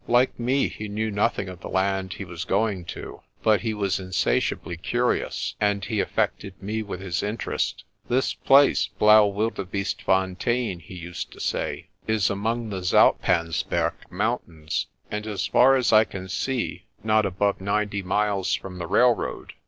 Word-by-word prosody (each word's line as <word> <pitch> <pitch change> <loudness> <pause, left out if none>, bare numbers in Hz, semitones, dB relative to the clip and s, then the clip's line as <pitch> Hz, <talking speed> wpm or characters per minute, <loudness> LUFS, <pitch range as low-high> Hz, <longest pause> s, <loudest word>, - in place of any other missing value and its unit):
Like 120 +1 +3
me, 130 +4 +2
he 105 - -7
knew 110 +2 -2
nothing 105 -1 0
of 90 -1 -8
the - - -8
land 95 -1 0
he 100 - -7
was 85 -1 -6
going 100 -2 0
to, - - -8 0.2
but 110 -1 +4
he 110 -2 -2
was 100 -3 0
insatiably 90 -1 -1
curious, 120 +8 -1
and 100 -2 +1
he - - -2
affected 95 -2 -1
me 105 +3 -3
with 100 -4 -6
his 90 -3 -2
interest. 105 +3 -2 0.3
"This 130 +2 +1
place, 140 +1 +4
Bkauwildebee 105 -2 +3
stefontein," 95 +3 0
he 85 +3 -12
used 85 -1 -6
to - - -15
say, - - -3 0.2
"is 110 -3 +2
among 110 +3 -2
the 95 -2 -3
Zoutpansberg 85 -2 +2 0.2
mountains, 80 -2 -2 0.2
and 105 +1 -3
as 105 -2 -2
far 135 +2 +5
as 125 -3 +2
I 110 0 +8
can 95 -3 -7
see, 115 -3 -2 0.2
not 110 -1 +3
above 100 +1 0
ninety 100 0 0
miles 100 0 +1
from 90 -1 -8
the 85 - -4
railroad. 120 +5 +1
100 Hz, 155 wpm, -25 LUFS, 95-110 Hz, 0.3 s, I